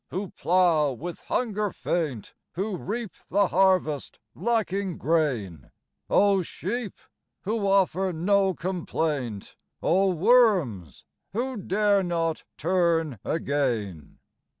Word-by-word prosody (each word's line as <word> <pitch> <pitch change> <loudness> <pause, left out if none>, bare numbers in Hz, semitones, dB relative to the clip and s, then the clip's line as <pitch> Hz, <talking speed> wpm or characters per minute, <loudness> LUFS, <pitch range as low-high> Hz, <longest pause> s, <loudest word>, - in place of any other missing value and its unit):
who 190 0 -4
plough, 170 -5 +2
with 170 +8 -7
hunger 210 -4 0
faint; 150 -13 -3 0.2
Who 195 +3 -2
reap 215 +3 -4 0.2
the 200 0 +2
harvest, 185 -6 +1 0.2
lacking 200 -6 -1
grain; 125 - -1 0.4
Oh 200 -1 +4
Sheep! 205 +5 -4 0.5
who 210 0 -1
offer 190 -1 +2
no 190 +3 +2
complaint; 155 - -3 0.3
Oh 190 +3 +3
Worms! 180 - +2 0.3
who 255 +5 -2
dare 205 0 +2
not 165 -3 -1
turn 165 - +1
again. 120 - -2
180 Hz, 100 wpm, -26 LUFS, 155-200 Hz, 0.5 s, Oh